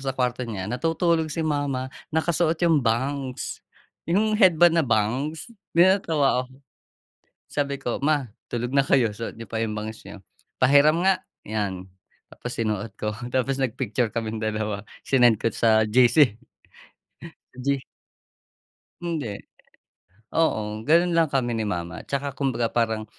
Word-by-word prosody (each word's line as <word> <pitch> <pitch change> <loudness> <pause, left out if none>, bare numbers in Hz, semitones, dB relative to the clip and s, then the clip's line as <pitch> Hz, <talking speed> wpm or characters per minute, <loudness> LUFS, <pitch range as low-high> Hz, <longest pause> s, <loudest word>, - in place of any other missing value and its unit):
sa 135 -1 -2
kuwarto 125 -1 0
niya 95 -4 -4
natutulog 165 +4 +1
si 160 +1 -2
mama 145 -4 -1 0.3
nakasuot 165 0 +2
'yong 165 -3 +4
bangs 130 +2 -2 0.5
'yong 215 +4 +2
headband 175 -3 +6
na 155 - 0
bangs 135 - -1 0.3
'di 170 - +8
natawa 155 -9 +2
ako. - - -19 1.0
Sabi 140 -1 -1
ko 120 - -2
ma 145 -5 +1 0.2
tulog 120 0 -2
na 140 0 +3
kayo 125 -5 +3
suot 115 +2 -6
niyo 115 -2 -9
pa 115 - -3
yung 105 - -4
bangs 110 +1 -6
nyo 100 0 -10 0.4
pahiram 145 +5 +5
nga. 190 -1 +2 0.2
'Yan 95 -4 -3 0.4
tapos 125 - -7
sinuot 110 -1 -2
ko 105 - -1 0.2
tapos 130 +1 0
nag-picture 120 -3 -1
kaming 115 -1 -3
dalawa 110 -1 -2 0.2
sinend 120 -5 +3
ko 115 - +2
sa 110 -1 +3
GC. 125 0 +5 1.2
G. 135 0 -1 1.2
Hindi. 155 -12 -3 0.9
Oo, 110 -9 0
gano'n 170 +5 +3
lang 165 -2 +3
kami 125 -3 0
ni 110 - -1
mama 85 -5 -4
tsaka 140 0 -3
kumbaga 125 -4 0
parang 110 -2 0
130 Hz, 135 wpm, -24 LUFS, 110-155 Hz, 1.2 s, di